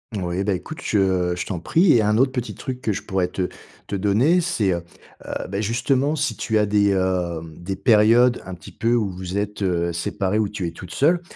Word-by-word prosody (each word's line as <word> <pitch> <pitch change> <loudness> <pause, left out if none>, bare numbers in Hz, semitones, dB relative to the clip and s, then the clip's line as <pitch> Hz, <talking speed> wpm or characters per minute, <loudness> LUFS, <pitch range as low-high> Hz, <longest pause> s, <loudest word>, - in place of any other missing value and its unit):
Moui, 90 -1 -2
bah 100 0 +1
écoute, 125 - -6
je 95 -4 +1
je 90 +1 -4
t'en 95 -4 -4
prie 165 - +3
et 115 - +5
un 105 0 +2
autre 130 +2 +3
petit 125 -2 -4
truc 130 -2 -6
que 110 - 0
je 100 - -4
pourrais 95 -2 0
te 90 0 -2 0.4
te - - -4
donner, 110 - +3
c'est, 105 - 0
heu 85 - -2 0.5
heu, - - -4
bah, 100 +2 -2
justement, 125 +7 +1
si 155 0 -1
tu 110 - -1
as 105 - +3
des, 100 0 +3
hem, 90 -4 -1
des 95 +3 -4
périodes 115 +3 +4
un 95 - -6
petit 80 - -13
peu 115 +1 0
où 110 -4 +1
vous 95 +1 -5
êtes, 105 0 -3
heu, 85 -3 0
séparés, 95 +4 -1
où 105 -2 +1
tu 100 -3 -4
es 85 - -3
toute 90 +2 -11
seule. 170 +5 +3
100 Hz, 225 wpm, -22 LUFS, 90-120 Hz, 0.5 s, et